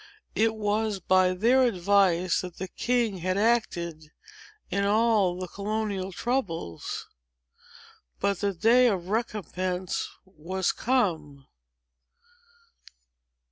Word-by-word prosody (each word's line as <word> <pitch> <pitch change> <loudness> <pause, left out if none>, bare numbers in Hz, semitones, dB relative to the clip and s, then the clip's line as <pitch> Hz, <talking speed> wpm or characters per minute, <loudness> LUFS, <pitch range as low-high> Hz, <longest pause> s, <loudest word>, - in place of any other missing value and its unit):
It 220 +1 +2
was 210 -1 -1
by 185 0 +3
their 240 +7 +4
advice 185 -5 +2
that 180 -2 -8
the 190 - -4
king 235 -3 0
had 185 +2 -1
acted, 170 -8 0 0.6
in 200 - 0
all 205 -3 +2
the 185 - -4
colonial 200 -1 -3
troubles. 180 - -3 1.1
But 200 -3 0
the 200 - 0
day 230 +7 +4
of 185 -5 -1
recompense 185 -4 -2 0.2
was 185 +1 -2
come. 160 - -1
195 Hz, 100 wpm, -27 LUFS, 180-220 Hz, 1.1 s, their